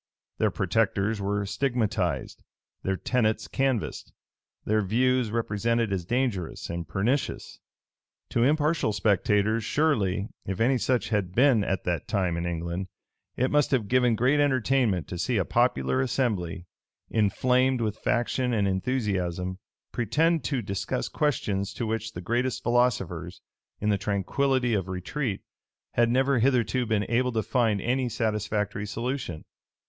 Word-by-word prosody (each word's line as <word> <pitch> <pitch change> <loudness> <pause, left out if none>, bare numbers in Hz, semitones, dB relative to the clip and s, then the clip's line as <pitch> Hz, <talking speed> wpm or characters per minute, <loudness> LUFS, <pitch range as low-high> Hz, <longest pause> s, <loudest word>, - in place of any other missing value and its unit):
Their - - +3
protectors 100 +2 0
were 100 +1 -1
stigmatized; 105 - -1 0.4
their 95 - -1
tenets 110 -2 0
canvassed; 135 -5 -1 0.5
their 110 0 +2
views 125 +4 +2
represented 115 0 0
as 90 -3 -2
dangerous 115 -9 -2
and 85 -1 -4
pernicious. 110 - -1 0.7
To 120 - 0
impartial 150 -3 +2
spectators 105 +2 +2
surely, 105 -9 +1
if 95 -1 -4
any 125 +3 +3
such 125 -5 0
had 100 -4 -1
been 125 -4 +5
at 95 -1 -1
that 85 -4 -2
time 90 -4 0
in 85 +1 -2
England, 85 +2 -3 0.5
it 130 +2 +1
must 150 -1 +3
have 120 -7 +1
given 125 0 +3
great 130 +6 +2
entertainment 130 - +2
to 90 - -5
see 120 +5 0
a 95 - +1
popular 65 -2 +1
assembly, 100 -9 -1 0.5
inflamed 125 +5 +2
with 110 -2 -2
faction 125 +1 0
and 105 -3 +2
enthusiasm, 95 -4 -1 0.3
pretend 160 +7 +1
to 125 0 -1
discuss 100 -1 -3
questions 105 -9 -1
to 120 - -2
which 110 0 -3
the 90 - -6
greatest 120 +5 -1
philosophers, 95 -8 0 0.4
in 105 - 0
the 100 -2 +2
tranquillity 120 +6 0
of 95 -3 0
retreat, 95 +5 -3 0.5
had 120 0 +3
never 130 +1 +2
hitherto 125 -1 +2
been 105 -2 +1
able 125 +2 +1
to 110 -2 -1
find 115 -5 +1
any 125 +4 0
satisfactory 105 -2 -1
solution. 115 - -4
110 Hz, 135 wpm, -27 LUFS, 95-125 Hz, 0.7 s, been